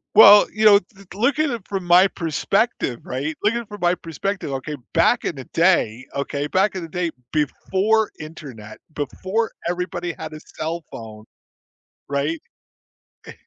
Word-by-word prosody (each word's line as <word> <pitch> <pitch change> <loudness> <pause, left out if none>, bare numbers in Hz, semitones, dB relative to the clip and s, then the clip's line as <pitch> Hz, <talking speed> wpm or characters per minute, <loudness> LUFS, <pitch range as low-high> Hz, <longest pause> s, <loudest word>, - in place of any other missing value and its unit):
Well, 205 -1 +9
you 215 +1 0
know, 205 -1 +8
to 195 +1 -19
to 190 - -10
look 255 +6 +2
at 310 -2 +2
it 230 -5 -6
from 195 -2 -3
my 175 +2 +6
perspective, 170 - -1
right? 140 +5 -3
Looking 230 +3 +1
from 205 0 -10
my 175 0 +3
perspective, 180 0 -4
okay, 135 +3 -4 0.2
back 170 +8 +3
in - - -2
the 135 - -7
day 145 -9 +2
okay, 140 +1 -2
back 190 +6 +2
in 185 - -3
the 165 - -7
day, 175 0 -2 0.2
before 195 +8 +1
internet, 135 -9 -10 0.2
before 190 - -2 0.2
everybody 175 0 -3
had 160 -1 -8
a 155 - -8 0.2
cellphone. 115 -10 -6 0.8
Right? 145 +3 -1 0.9
Eh - - -8
175 Hz, 155 wpm, -22 LUFS, 150-200 Hz, 0.9 s, Well